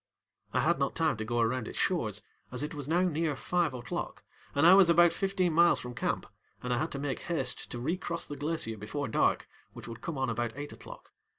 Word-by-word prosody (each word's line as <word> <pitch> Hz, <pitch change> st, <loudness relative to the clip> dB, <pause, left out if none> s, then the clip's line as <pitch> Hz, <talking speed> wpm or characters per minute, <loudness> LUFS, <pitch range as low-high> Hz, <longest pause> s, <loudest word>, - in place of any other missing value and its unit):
I -, -, +1 dB
had -, -, +2 dB
not -, -, 0 dB
time -, -, +2 dB
to 110 Hz, -, -3 dB
go 120 Hz, +1 st, 0 dB
around 115 Hz, 0 st, 0 dB
its -, -, -6 dB
shores, 110 Hz, -, 0 dB, 0.3 s
as 125 Hz, +2 st, -2 dB
it 150 Hz, -, -4 dB
was 145 Hz, -3 st, -6 dB
now 170 Hz, +3 st, +2 dB
near 160 Hz, -3 st, 0 dB
five 170 Hz, +1 st, 0 dB
oŌĆÖclock 120 Hz, -2 st, -4 dB, 0.4 s
and 145 Hz, +3 st, +4 dB
I 175 Hz, -, +9 dB
was 190 Hz, -2 st, +7 dB
about 170 Hz, 0 st, +6 dB
fifteen 190 Hz, -3 st, 0 dB
miles 170 Hz, +2 st, +5 dB
from 125 Hz, 0 st, -6 dB
camp, 120 Hz, -, -2 dB, 0.4 s
and 125 Hz, 0 st, -1 dB
I 120 Hz, -, +1 dB
had 155 Hz, -, -2 dB
to -, -, -3 dB
make 140 Hz, -1 st, -2 dB
haste 135 Hz, -7 st, -2 dB
to 120 Hz, -, -5 dB
recross 170 Hz, +5 st, -2 dB
the 145 Hz, -, -6 dB
glacier 145 Hz, -6 st, -2 dB
before 105 Hz, +8 st, -4 dB
dark, 110 Hz, -, +1 dB, 0.3 s
which -, -, -10 dB
would 115 Hz, -1 st, -8 dB
come 165 Hz, -4 st, -4 dB
on 130 Hz, 0 st, 0 dB
about 120 Hz, 0 st, -2 dB
eight 145 Hz, +1 st, -6 dB
oŌĆÖclock. -, -, -12 dB
145 Hz, 225 wpm, -30 LUFS, 120-170 Hz, 0.4 s, I